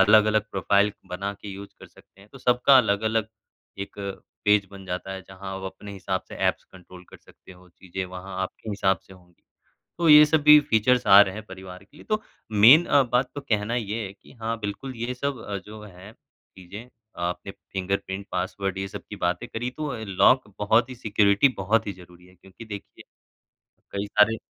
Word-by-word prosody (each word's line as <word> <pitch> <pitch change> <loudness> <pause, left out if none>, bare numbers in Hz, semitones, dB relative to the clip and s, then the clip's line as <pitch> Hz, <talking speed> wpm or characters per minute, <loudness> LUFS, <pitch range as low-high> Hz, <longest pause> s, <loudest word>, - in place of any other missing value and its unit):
अलग-अलग 110 +1 +4
प्रोफाइल 100 +2 +2 0.2
बना 100 +3 -4
के 105 - -9
यूज़ 100 +1 -9
कर - - -11
सकते 100 - -22
हैं। 100 - -18
तो 135 - -12
सबका 125 +2 +4
अलग-अलग 110 0 +1 0.5
एक 100 - -7 0.5
पेज 105 -1 +4
बन 100 -1 -11
जाता 90 +1 -5
है, 95 0 -7
जहाँ 95 0 -8
आप 95 - -8
अपने 100 +1 -11
हिसाब 95 -1 -3
से - - -9
ऐप्स - - -1
कंट्रोल 90 -1 -15
कर - - -12
सकते 95 - -18
हो, 90 0 -19
चीजें 95 +1 -7
वहाँ 95 +1 -8
आपके 100 +3 -7
हिसाब 95 -3 +1
से 95 - -15
होंगी। 90 -2 -21 0.6
तो 170 -2 +2
ये 150 0 +10
सब 155 0 +2
भी 150 0 +9
फीचर्स 120 +3 +3
आ 100 +1 +9
रहे 95 -2 +3
हैं 110 - -7
परिवार 95 0 -11
के 145 - -23
लिए, - - -14
तो 215 0 -1 0.3
मेन 120 +11 +7
अ, 140 -1 +4
बात 125 +1 0
तो 145 - -5
कहना 110 -1 -1
ये 110 -1 -3
है 95 - -9
कि 100 - -20
हाँ, 115 -2 -4
बिल्कुल 110 +6 -5
ये 120 +2 -3
सब 140 +1 -3
अ, 100 - -4
जो 105 0 -10
हैं 100 +1 -13
चीजें, 95 +6 -14 0.3
आपने 90 +2 -4 0.2
फिंगरप्रिंट, 95 +1 -3
पासवर्ड 95 +1 -3
ये 95 - -3
सब - - -8
की - - -7
बातें 90 +7 -2
करी 120 +1 -4
तो 150 -3 -3
ल 110 -2 -6
लॉक 125 -6 +4
बहुत 110 +4 +2
ही - - -7
सिक्योरिटी 105 +2 +3
बहुत 110 +4 +1
ही 100 - -3
ज़रूरी 90 0 -17
है। 90 - -20
क्योंकि 95 +5 -14
देखिए, 100 -2 -10 0.9
कई 100 +1 -2
सारे 105 +2 +3
100 Hz, 200 wpm, -25 LUFS, 95-115 Hz, 0.9 s, ये